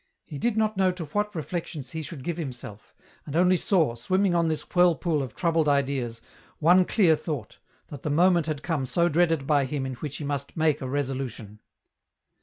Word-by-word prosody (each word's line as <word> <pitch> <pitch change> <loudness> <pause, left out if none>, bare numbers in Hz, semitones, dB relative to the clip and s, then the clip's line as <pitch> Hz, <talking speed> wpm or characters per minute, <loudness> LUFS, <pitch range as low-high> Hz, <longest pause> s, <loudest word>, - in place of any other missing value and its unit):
He 145 - -8
did 235 +3 0
not 215 -2 +1
know 190 -1 +3
to 175 -3 -6
what 210 +7 -2
reflections 160 -5 -5
he 160 - -4
should 150 -3 -8
give 170 +2 -3
himself, 120 -9 -8 0.3
and 145 - -5
only 180 +2 +4
saw, 170 - +2
swimming 185 +11 +1
on 170 -1 +2
this 155 -1 -1
whirlpool 175 -3 +2
of 130 -4 -6
troubled 165 -3 +1
ideas, 135 -5 0 0.4
one 180 +4 +5
clear 175 -7 +4
thought, 150 - -6 0.3
that 145 -3 -8
the 150 - -3
moment 170 +1 +3
had 150 -2 -3
come 150 -7 -1
so 170 +6 +2
dreaded 165 -3 +2
by 145 -1 +2
him 135 0 -3
in 130 - -4
which 140 +3 -6
he - - -6
must 140 0 -4
make 155 -2 +2
a 130 - -4
resolution. 130 -6 -4
155 Hz, 195 wpm, -26 LUFS, 135-175 Hz, 0.4 s, one